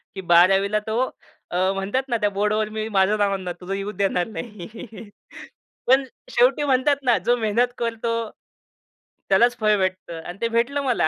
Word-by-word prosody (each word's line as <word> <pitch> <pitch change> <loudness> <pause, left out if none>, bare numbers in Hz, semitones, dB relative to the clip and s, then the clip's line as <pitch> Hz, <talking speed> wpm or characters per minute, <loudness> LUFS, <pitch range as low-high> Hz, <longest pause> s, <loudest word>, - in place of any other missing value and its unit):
की 190 - -5
12वीला 195 +4 +4
तो 220 +3 0 0.5
अ, 175 - -1 0.2
म्हणतात 195 +7 -1
ना 235 - +1
"त्या 205 - +3
बोर्डवर 210 +2 0
मी 215 0 -4
माझं 200 0 +2
नाव 205 -1 +2
आणणारं, 185 -3 -4
तुझं 185 +2 -5
येऊच 200 +2 -4
देणार 185 -2 0
नाही." 215 0 -9 0.8
पण 265 +2 +5 0.3
शेवटी 255 +4 +3
म्हणतात 275 +1 +3
ना, 245 -3 +3
"जो 240 +2 +1
मेहनत 230 +2 +1
करतो, 230 0 -2 1.2
त्यालाच 235 +6 +4
फळ 215 -1 +3
भेटतं 185 -3 -3
आणि 175 - -8
ते 230 - +2
भेटलं 250 +5 +1
मला." 250 -11 +1
215 Hz, 165 wpm, -23 LUFS, 195-235 Hz, 1.2 s, पण